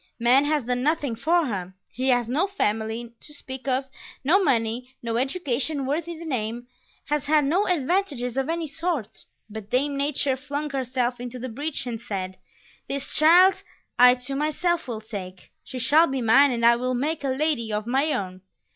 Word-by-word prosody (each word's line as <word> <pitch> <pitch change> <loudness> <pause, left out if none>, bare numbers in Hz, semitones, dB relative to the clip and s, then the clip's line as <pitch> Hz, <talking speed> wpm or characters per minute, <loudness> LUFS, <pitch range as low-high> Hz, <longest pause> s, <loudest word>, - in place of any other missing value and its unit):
Man 250 +4 +4
has 295 -2 +1
done 250 0 -1
nothing 290 -4 0
for 330 +7 +2
her; 190 -6 -4 0.2
she 255 +2 -3
has 245 -2 +2
no 300 +11 +1
family 225 - -2
to 295 - -8
speak 260 -1 -8
of, 265 +1 +1 0.4
no 365 +9 +4
money, 245 -2 0
no 230 -1 -2
education 275 0 -1
worthy 325 +4 -2
the 335 - -9
name, 240 -4 -3 0.4
has 295 -1 -1
had 300 -1 +4
no 355 +9 +1
advantages 295 -7 0
of 270 +2 -1
any 335 0 -1
sort; 315 - -3 0.2
but 215 -1 -9
Dame 280 +3 0
Nature 280 -1 0
flung 285 +2 -4
herself 250 -2 -1
into 245 +1 -6
the 255 +1 -5
breach 285 +4 -4
and 235 -2 -5
said: 190 -3 -5 0.5
"This 280 0 -4
child 355 +5 +6 0.4
I 250 0 +8
to 250 +2 -6
myself 310 +4 0
will 225 -3 -4
take; 190 -4 -8
She 260 - -8
shall 295 +7 +4
be 270 -2 -2
mine 270 +6 +6
and 235 -2 0
I 235 0 +6
will 255 +1 -1
make 295 +5 -1
A - - -1
Lady 265 -4 0
of 210 0 -2
my 270 +6 +1
own." 185 -6 -3
265 Hz, 180 wpm, -25 LUFS, 235-300 Hz, 0.5 s, I